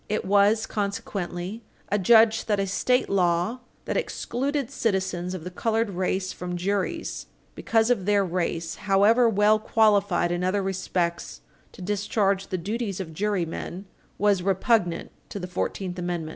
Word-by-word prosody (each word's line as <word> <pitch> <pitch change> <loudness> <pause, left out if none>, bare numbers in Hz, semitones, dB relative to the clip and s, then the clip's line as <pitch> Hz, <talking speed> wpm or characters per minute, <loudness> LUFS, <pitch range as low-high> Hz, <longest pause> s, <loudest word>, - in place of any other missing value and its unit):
It 210 - -1
was, 205 +3 +3
consequently, 200 -1 -4 0.3
adjudged 220 +3 +4
that 205 -2 +1
a 195 - +1
state 250 +6 +1
law 180 +4 +1 0.3
that - - -1
excluded 280 - -2
citizens 190 -7 -1
of 175 - -7
the 180 - -6
colored 225 +2 0
race 185 0 -1
from 180 0 -5
juries, 195 +1 -2 0.3
because 225 +1 +1
of 200 -6 0
their 205 -1 +3
race 170 -2 -2
and - - -12
however 210 +5 +5
well 210 0 +4
qualified 205 -5 +2
in 175 +1 -1
other 190 +2 +1
respects 180 -3 -2 0.3
to 185 - -10
discharge 200 0 0
the 185 - -2
duties 205 +2 -3
of 165 -4 -6
jurymen, 185 0 -3 0.3
was 205 -2 +2
repugnant 190 -1 +1 0.2
to - - -6
the 185 - -4
Fourteenth 180 0 -3
Amendment. 175 -3 -3
195 Hz, 145 wpm, -25 LUFS, 180-215 Hz, 0.3 s, however